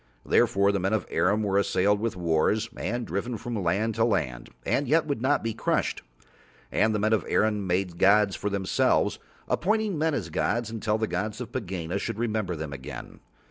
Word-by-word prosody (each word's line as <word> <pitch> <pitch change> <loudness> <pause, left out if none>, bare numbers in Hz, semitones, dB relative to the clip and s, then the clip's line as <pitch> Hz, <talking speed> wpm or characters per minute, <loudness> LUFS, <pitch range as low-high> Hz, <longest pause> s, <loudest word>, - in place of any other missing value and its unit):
Therefore 100 0 +3
the 100 - 0
men 95 +3 0
of 110 - 0
Arim 105 +3 +2
were 100 -1 +2
assailed 100 +1 +2
with 115 -1 -2
wars 90 +6 +1
and 120 +1 -3
driven 110 +6 -3
from 115 -1 -4
land 100 +6 +1
to 115 - +1
land 65 - -1 0.2
and 140 - +1
yet 160 +4 +3
would 140 -6 -2
not 140 +3 +2
be 115 -1 -1
crushed. - - -1 0.7
And 110 +1 +2
the - - +2
men 110 +2 +2
of 110 - +2
Arim 105 -3 +1
made 90 +1 0
them 85 - -15
gods 100 0 +5
for 105 - -2
themselves, 100 -2 +1 0.3
appointing 210 -3 0
men 160 -1 +1
as 85 - -4
gods 115 +7 0
until 110 -1 -1
the 110 - 0
gods 105 +1 -3
of 120 -2 -6
Pegāna 95 -6 -3
should 115 +1 -4
remember 110 -6 -1
them 75 -2 -5
again. 65 -2 -8
105 Hz, 195 wpm, -27 LUFS, 95-115 Hz, 0.7 s, gods